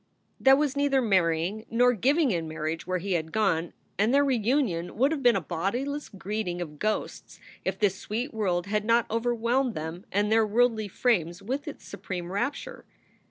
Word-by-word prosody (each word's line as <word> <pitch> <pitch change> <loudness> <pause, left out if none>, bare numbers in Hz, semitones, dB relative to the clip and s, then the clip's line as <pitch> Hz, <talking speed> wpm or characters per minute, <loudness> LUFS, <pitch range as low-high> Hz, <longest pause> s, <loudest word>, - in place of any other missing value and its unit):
There 265 0 +6
was 290 -1 0
neither 280 -1 +2
marrying 185 -2 +1
nor 245 +2 +4
giving 275 - +2
in 165 -3 -1
marriage 160 +1 -4
where 185 0 0
he 195 +3 -5
had 160 -2 -2
gone, 175 -6 +1 0.3
and 215 +3 +3
their 285 +1 +4
reunion 235 - 0
would 270 +5 +3
have 310 -3 -2
been 245 -2 +5
a 195 - 0
bodiless 240 - -3
greeting 195 -2 -4
of 150 -4 -6
ghosts 215 0 -3 0.2
if 190 0 -2
this 205 -2 +2
sweet 235 +8 -4
world 185 -5 0
had 210 +1 -1
not 230 +1 +3
overwhelmed 235 +2 0
them 160 +4 -6
and 205 +2 +1
their 220 0 +4
worldly 225 -1 +2
frames 180 - 0
with 270 +9 -3
its 295 - -8
supreme 180 -3 -6
rapture. 280 - -3
215 Hz, 175 wpm, -27 LUFS, 180-250 Hz, 0.3 s, There